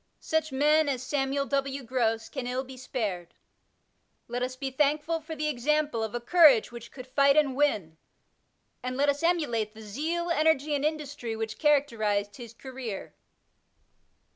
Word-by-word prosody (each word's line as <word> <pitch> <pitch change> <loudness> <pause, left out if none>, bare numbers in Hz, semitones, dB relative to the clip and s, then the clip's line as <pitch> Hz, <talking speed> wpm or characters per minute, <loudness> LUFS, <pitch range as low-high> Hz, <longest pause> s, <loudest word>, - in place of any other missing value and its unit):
Such 315 -1 -1
men 300 +3 +3
as 260 -2 -2
Samuel 275 0 -1
W. 275 -1 -2
Gross 225 -2 0
can 245 +1 -5
ill 255 +1 -2
be 265 0 -11
spared. 210 -9 -4 0.9
Let 245 +1 -3
us 255 +1 -2
be 265 0 -4
thankful 300 +4 +1
for 320 +1 -7
the 305 0 -2
example 295 -2 0
of 220 +1 -4
a - - -1
courage 280 -3 +5
which 235 -1 -10
could 255 -2 -9
fight 275 +2 +3
and 280 -4 +3
win; 210 - 0 0.8
and 255 0 -4
let 285 +1 +3
us 285 0 0
emulate 240 -11 0
the 220 - -11
zeal, 325 +11 -2
energy, 310 -2 +2
and 285 -1 0
industry 290 -6 -3
which 220 0 -5
characteruEed 220 -9 +1
his 235 -3 -9
career. 250 -4 -7
270 Hz, 160 wpm, -28 LUFS, 235-295 Hz, 0.9 s, courage